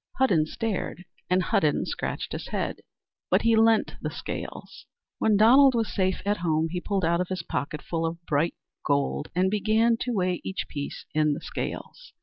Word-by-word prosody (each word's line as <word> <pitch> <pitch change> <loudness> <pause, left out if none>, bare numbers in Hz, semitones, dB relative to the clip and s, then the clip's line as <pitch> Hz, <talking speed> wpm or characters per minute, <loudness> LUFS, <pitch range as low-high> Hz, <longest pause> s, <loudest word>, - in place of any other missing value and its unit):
Hudden 180 -13 +3
stared 190 -3 -3 0.2
and 180 0 +3
Hudden 150 -3 +1
scratched - - -4
his - - -5
head, - - -2 0.5
but - - +3
he 230 0 +4
lent 225 0 +3
the - - -2
scales. - - -7 0.3
When 215 -2 +3
Donald 260 +5 +7
was 225 -2 -1
safe 185 -1 0
at 205 +1 +1
home, 160 -1 0
he 175 +1 -3
pulled 195 -3 -1
out 170 +2 +1
his 185 -2 -4
pocketful 165 +2 -3
of 170 +1 -7
bright 155 +2 +1 0.3
gold 140 +1 0
and 185 +1 +2
began 220 +3 +2
to 245 - -3
weigh 185 -5 0
each 190 - -3
piece 140 -1 -6
in 150 -1 +3
the - - -4
scales. - - -6
185 Hz, 170 wpm, -26 LUFS, 165-220 Hz, 0.5 s, Donald